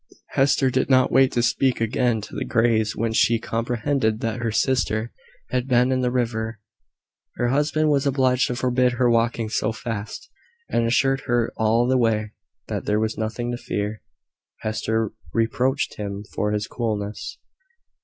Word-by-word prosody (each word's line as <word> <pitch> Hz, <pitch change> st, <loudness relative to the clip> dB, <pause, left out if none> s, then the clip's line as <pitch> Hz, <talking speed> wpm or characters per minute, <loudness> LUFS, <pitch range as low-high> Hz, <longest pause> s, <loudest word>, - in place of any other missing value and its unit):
Hester 135 Hz, -1 st, +2 dB
did 130 Hz, -, 0 dB
not 130 Hz, -1 st, +4 dB
wait 135 Hz, +1 st, +5 dB
to 120 Hz, -, +1 dB
speak 130 Hz, +2 st, +1 dB
again 115 Hz, 0 st, +1 dB
to -, -, -10 dB
the -, -, -2 dB
Greys 110 Hz, -2 st, +1 dB
when 115 Hz, 0 st, -1 dB
she 115 Hz, +1 st, +3 dB
comprehended 115 Hz, 0 st, -1 dB
that 115 Hz, +1 st, -2 dB
her 115 Hz, -1 st, -1 dB
sister 120 Hz, -2 st, 0 dB, 0.4 s
had 125 Hz, 0 st, -1 dB
been 125 Hz, 0 st, +3 dB
in 130 Hz, 0 st, +1 dB
the 125 Hz, -, +1 dB
river. 115 Hz, -3 st, -2 dB, 0.8 s
Her 120 Hz, -, 0 dB
husband 150 Hz, +3 st, +2 dB
was 140 Hz, -1 st, +2 dB
obliged 130 Hz, -2 st, +2 dB
to 125 Hz, -, -2 dB
forbid 125 Hz, 0 st, +1 dB
her 120 Hz, 0 st, +2 dB
walking 115 Hz, -1 st, +1 dB
so 110 Hz, 0 st, 0 dB
fast, 110 Hz, -2 st, -6 dB, 0.4 s
and 115 Hz, -1 st, +1 dB
assured 135 Hz, +3 st, +2 dB
her 120 Hz, -1 st, +1 dB
all 110 Hz, +2 st, +2 dB
the 130 Hz, 0 st, +3 dB
way 110 Hz, -2 st, +1 dB, 0.4 s
that -, -, -4 dB
there 105 Hz, 0 st, +1 dB
was 110 Hz, 0 st, -1 dB
nothing 115 Hz, +2 st, -3 dB
to 120 Hz, -, -3 dB
fear. 105 Hz, -2 st, -4 dB, 0.6 s
Hester 110 Hz, 0 st, -1 dB, 0.2 s
reproached 125 Hz, +4 st, 0 dB
him 100 Hz, -1 st, -5 dB
for 105 Hz, -, 0 dB
his 105 Hz, 0 st, -1 dB
coolness. 105 Hz, -3 st, -4 dB
120 Hz, 165 wpm, -23 LUFS, 110-130 Hz, 0.8 s, wait